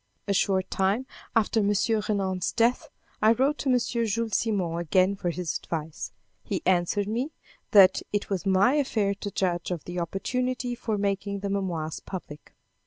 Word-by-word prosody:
A 200 - +2
short 190 -1 +1
time 195 +7 +1 0.3
after 225 0 +3
M. 205 -1 +2 0.4
Renan's 190 -3 0
death, 235 +1 +2 0.3
I 215 +1 +6
wrote 275 +6 +1
to 275 - -1
M. 250 - +5
Jules 230 -2 -1
Simon 185 -7 0
again 185 +4 +2
for 180 -2 -2
his 170 -2 -2
advice. 160 -2 -5 0.3
He - - -3
answered 185 +2 +2
me, 245 +8 -2 0.4
that 190 -3 +7
it 205 0 -1
was 195 -3 -2
my 195 +6 +4
affair 225 -9 +1
to 205 +1 -5
judge 180 -3 -1
of 175 -4 -3
the 175 0 -5
opportunity 250 +8 -2
for 230 -3 -2
making 200 0 -1
the 200 -1 -2
memoirs 170 -6 -2
public. 150 -6 -9
200 Hz, 165 wpm, -27 LUFS, 185-225 Hz, 0.4 s, that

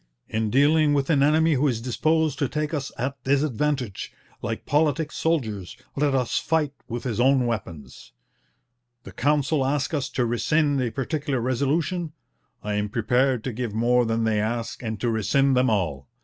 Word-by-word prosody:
In 110 -1 -1
dealing 145 +4 +4
with 140 +2 +1
an 140 -3 +3
enemy 160 +3 +4
who 145 +1 +2
is 120 -5 0
disposed 155 +5 0
to 140 - 0
take 150 +1 -2
us 140 -3 -3
at 130 +1 -4
disadvantage, 140 -4 -1 0.3
like 115 -1 -4
politic 150 +1 +1
soldiers, 110 - -2 0.2
let 140 -1 +1
us 125 -3 +1
fight 155 -3 0
with 120 0 -5
his 120 -3 -3
own 130 0 +4
weapons.... 95 -10 -6 0.9
The - - -10
Council 145 +2 +1
ask 140 +3 -1
us 140 -3 -1
to 125 - 0
rescind 145 +4 +1
a 125 - 0
particular 140 +1 -2
resolution; 150 +7 -1 0.5
I 105 - -2
am 105 0 -1
prepared 125 +2 +1
to 130 - -3
give 115 -2 -4
more 120 +2 +3
than 115 0 0
they 110 -1 +1
ask 115 +1 -3
and 110 -3 -4
to 120 - +1
rescind 135 +5 +2
them 125 0 +3
all. 80 - -1
130 Hz, 170 wpm, -24 LUFS, 115-150 Hz, 0.9 s, dealing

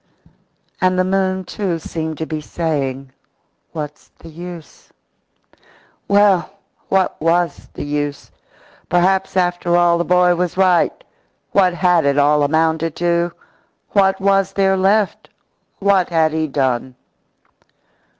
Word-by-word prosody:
And 185 0 +2
the 185 - +3
moon, 190 0 0
too, 185 -1 -3
seemed 160 -1 -5
to 160 - -3
be 155 -1 -5
saying: 140 -5 -3 0.6
"What's 150 -2 -7
the 165 - -13
use?" 170 -1 -11 1.2
Well, 200 -3 +3 0.4
what 190 -4 0
was 170 +2 0
the - - -5
use? 145 0 -4 0.6
Perhaps, 190 +2 +1
after 175 -1 +1
all, 170 -1 +3
the - - +1
boy 180 0 +3
was 175 0 -2
right. 185 - +2 0.5
What 185 -3 +3
had 180 -2 +3
it 140 0 +1
all 145 +1 +3
amounted 160 +2 +1
to? 170 0 0 0.6
What 195 -1 +2
was 195 0 +1
there 195 -1 +2
left? 195 +2 +1 0.5
What 195 -2 +2
had 160 -2 +2
he 160 0 -1
done? 130 -2 -1
175 Hz, 120 wpm, -18 LUFS, 155-190 Hz, 1.2 s, the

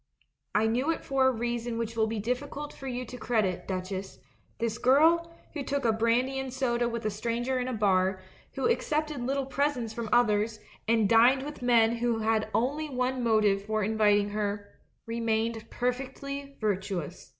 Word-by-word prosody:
I 215 - +4
knew 245 +7 +1
it 330 - -1
for 270 -1 +3
a - - +4
reason 240 0 -2
which 230 0 -3
will 220 -1 +2
be 220 -1 -3
diffi 250 +6 -2
cult 295 +1 -6
for 270 - -9
you 250 0 -3
to 250 +1 -9
credit, 215 -7 0
Duchess; 190 +1 -4 0.4
this 230 0 -2
girl, 325 +6 +4 0.2
who 300 - -3
took 280 0 -2
a 225 - +5
brandy 240 +4 +1
and 265 -1 -4
soda 240 -2 0
with 235 -2 -4
a 215 - +1
stranger 235 +4 -1
in 250 - -2
a 255 - -2
bar, 190 -3 +2 0.3
who - - -2
accepted 305 - 0
little 270 +2 -1
presents 270 -4 -1
from 230 -2 -4
others, 215 -2 +2 0.3
and 225 -2 +3
dined 240 +5 +5
with 295 -1 -7
men 235 -1 +4
who 235 -1 0
had 220 0 0
only 290 +7 0
one 255 -1 -1
motive 215 -3 +3
for 215 0 -1
in 220 +3 -1
viting 205 -1 +3
her, 205 -1 -3 0.4
remained 230 -1 -1
perfectly 275 +3 -4
virtuous. 190 -5 -3
235 Hz, 180 wpm, -28 LUFS, 215-260 Hz, 0.4 s, a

